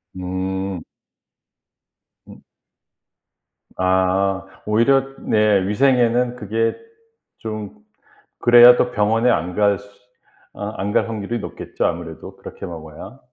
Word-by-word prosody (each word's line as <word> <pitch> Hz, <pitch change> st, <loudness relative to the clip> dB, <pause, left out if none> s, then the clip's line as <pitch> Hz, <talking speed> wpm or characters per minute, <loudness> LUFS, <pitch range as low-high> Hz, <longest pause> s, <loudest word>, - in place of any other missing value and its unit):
음. 95 Hz, 0 st, -4 dB, 1.5 s
음. -, -, -14 dB, 1.4 s
아 95 Hz, +1 st, +1 dB, 0.2 s
오히려 135 Hz, +5 st, +2 dB
네 105 Hz, -3 st, +2 dB
위생에는 125 Hz, +1 st, +2 dB
그게 115 Hz, 0 st, -1 dB, 0.6 s
좀 110 Hz, -2 st, -7 dB, 0.7 s
그래야 120 Hz, 0 st, +8 dB
더 125 Hz, -, +1 dB
병원에 115 Hz, +2 st, +2 dB
안 90 Hz, -4 st, -1 dB
갈 100 Hz, -1 st, +2 dB
수 100 Hz, -, -15 dB, 0.7 s
아 105 Hz, +1 st, -6 dB
안 100 Hz, +2 st, -2 dB
갈 -, -, +1 dB
확률이 110 Hz, +1 st, -4 dB
높겠죠 -, -, -4 dB
아무래도 -, -, -6 dB
그렇게 -, -, -9 dB
먹어야. 85 Hz, -, -10 dB
105 Hz, 195 characters per minute, -20 LUFS, 95-120 Hz, 1.5 s, 그래야